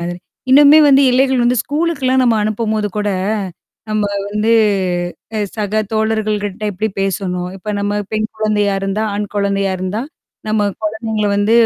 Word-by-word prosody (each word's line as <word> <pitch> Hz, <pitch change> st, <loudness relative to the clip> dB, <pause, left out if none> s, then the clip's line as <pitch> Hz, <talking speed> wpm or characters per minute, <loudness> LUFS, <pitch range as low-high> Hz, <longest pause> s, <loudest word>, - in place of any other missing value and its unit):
மாதிரி. 175 Hz, +1 st, -4 dB, 0.3 s
இன்னுமே 290 Hz, +3 st, +8 dB
வந்து 275 Hz, 0 st, +6 dB
எல்லைகள் 260 Hz, 0 st, +2 dB
வந்து 245 Hz, +1 st, +2 dB
ஸ்கூலுக்கல்லாம் 285 Hz, -4 st, 0 dB
நம்ம 235 Hz, -3 st, +3 dB
அனுப்பும்போது 215 Hz, 0 st, -1 dB
கூட, 205 Hz, 0 st, 0 dB, 0.8 s
நம்ப 215 Hz, -1 st, 0 dB, 0.3 s
வந்து 210 Hz, +2 st, +1 dB, 0.8 s
அ -, -, 0 dB, 0.2 s
சக 210 Hz, -1 st, -3 dB, 0.2 s
தோழர்கள 220 Hz, -1 st, 0 dB
கிட்ட 205 Hz, +1 st, -6 dB
எப்டி 215 Hz, +4 st, -2 dB
பேசணும்? 185 Hz, -2 st, -2 dB
இப்ப 205 Hz, +3 st, -11 dB
நம்ம 205 Hz, +1 st, -1 dB
பெண் 215 Hz, 0 st, -1 dB
குழந்தையா 210 Hz, -2 st, +1 dB
இருந்தா, 195 Hz, +2 st, -1 dB
ஆண் 205 Hz, 0 st, -4 dB
குழந்தையா 200 Hz, -1 st, 0 dB
இருந்தா? 190 Hz, +5 st, -3 dB, 0.5 s
நம்ம 215 Hz, -1 st, +1 dB, 0.2 s
குழந்தைங்கள 220 Hz, 0 st, -2 dB
வந்து 205 Hz, +2 st, +1 dB
215 Hz, 145 wpm, -17 LUFS, 205-230 Hz, 0.8 s, இன்னுமே